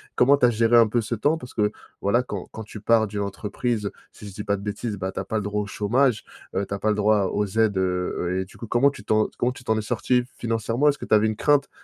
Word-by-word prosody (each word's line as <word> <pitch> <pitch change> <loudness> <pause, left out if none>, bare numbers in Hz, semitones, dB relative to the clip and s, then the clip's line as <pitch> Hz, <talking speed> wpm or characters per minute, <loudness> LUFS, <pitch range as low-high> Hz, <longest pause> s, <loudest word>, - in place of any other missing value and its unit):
Comment 135 +3 +5
tu 140 - +3
as 120 - +5
géré 115 +1 +2
un 115 -2 +7
peu 120 +2 +1
ce 115 +1 -2
temps 145 +9 +1
parce 125 -4 -11
que, 105 -1 +1 0.3
voilà, 110 +5 +2
quand 100 -7 -6
quand 110 - -7
tu 105 0 -10
pars 115 -2 +3
d'une 100 0 -4
entreprise, 105 +2 -2 0.2
si 105 - -11
je 100 - -9
dis 105 +2 -6
pas 100 -1 0
de 100 - -9
bêtises, 105 +1 -4
bah, 95 0 -4
tu - - -3
as - - -5
pas 110 +3 -2
le - - 0
droit 105 +1 -1
au 100 - -5
chômage. 115 +3 +1 0.3
Heu, 100 +1 -1
tu 100 - -6
as 100 - -3
pas 110 - 0
le 105 - +2
droit 105 -1 +3
aux 105 - 0
aux - - -1
aides, 110 -3 +3
heu 90 -1 0
heu 90 - -1
et - - -4
du 95 - -17
coup, 115 - -8
comment 120 +5 +4
tu - - -12
t'en 110 0 +2
comment 125 +1 0
tu 130 - -13
t'en 110 -2 +1
es 110 - 0
sorti 120 +2 +1
financièrement? 115 +4 +1
Est-ce 145 - 0
que - - -7
tu - - -1
avais 105 +1 +4
une 110 - -1
crainte 145 0 +2
110 Hz, 305 wpm, -24 LUFS, 100-120 Hz, 0.3 s, un